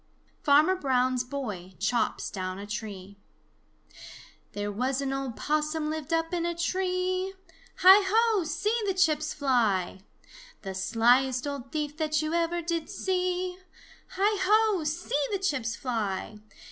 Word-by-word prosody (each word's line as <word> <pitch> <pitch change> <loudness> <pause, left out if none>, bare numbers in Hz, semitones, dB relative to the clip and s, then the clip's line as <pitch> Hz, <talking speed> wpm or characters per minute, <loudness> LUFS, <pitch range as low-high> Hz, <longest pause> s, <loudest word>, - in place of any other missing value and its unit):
XXI - - -38
FARMER 300 +6 +5
BROWN'S 255 -4 +1
BOY 210 -9 -6
CHOPS 230 +5 -1
DOWN 185 -1 -4
A 200 - -7
TREE 200 -2 -7 1.3
"There 205 0 -3
was 255 +6 -1
an 275 -1 -2
old 270 -3 -3
Possum 305 +1 -1
lived 315 0 -5
up 330 +1 0
in 345 -1 0
a 345 0 -1
tree; 370 +2 -1 0.5
Hi, 380 +3 +9
ho, 445 -1 +3
see 325 +7 -1
the 385 - 0
chips 310 -4 +2
fly! 225 -10 +1 0.6
The 195 -2 -5
sliest 245 +6 +2
old 275 -3 -5
thief 300 -1 -3
that 310 -1 0
you 310 +1 -2
ever 340 0 0
did 335 -1 -2
see; 365 -1 -1 0.5
Hi, 405 +2 +1
ho, 425 -2 +3
see 305 -1 -1
the 400 - +1
chips 280 - -1
fly! 215 -5 -3
300 Hz, 140 wpm, -28 LUFS, 240-360 Hz, 1.3 s, Hi